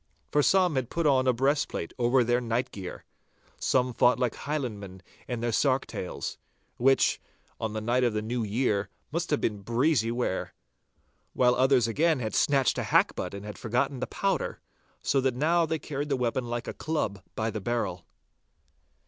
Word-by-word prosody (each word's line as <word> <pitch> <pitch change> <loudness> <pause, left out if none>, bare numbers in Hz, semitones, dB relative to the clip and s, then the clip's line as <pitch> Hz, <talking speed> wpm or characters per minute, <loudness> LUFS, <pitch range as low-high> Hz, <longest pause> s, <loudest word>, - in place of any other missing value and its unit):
For 145 - +4
some 185 +2 +4
had 130 -3 -1
put 170 -1 -1
on 130 -3 +4
a - - +6
breastplate 135 - 0
over 125 +1 +4
their 120 +1 +1
night 120 +1 -1
gear; 95 -3 -8 0.5
some 125 -1 +1
fought 125 +2 +4
like 125 -2 0
Highlandmen 105 -11 -5 0.2
in 120 -2 -3
their 120 0 0
sark 135 +3 +2
tails, 90 - -5 0.4
which, 135 +2 +3 0.4
on 110 -1 -3
the 110 - -3
night 120 +3 +1
of 120 - +3
the 105 - -1
New 120 +2 -2
Year, 105 -2 0 0.2
must 170 +2 -2
have 150 - +2
been 105 -2 -1
breezy 120 +2 +2
wear; 120 -5 -2 0.8
while 125 -1 +4
others 130 -2 +3
again 155 +7 +2
had 110 -4 -3
snatched 135 -3 +2
a - - -1
hackbutt - - +1
and 100 +1 -8
had 105 - -8
forgotten 125 +3 0
the - - -2
powder, 195 0 -1 0.4
so 135 - +2
that 130 -2 +1
now 165 +5 +2
they 160 +1 0
carried 145 -1 -4
the 135 - +1
weapon 125 0 -1
like 120 0 -4
a - - -3
club 130 -11 -2
by 110 +1 -1
the 110 -1 -4
barrel. 100 -5 -2
125 Hz, 180 wpm, -28 LUFS, 110-140 Hz, 0.8 s, a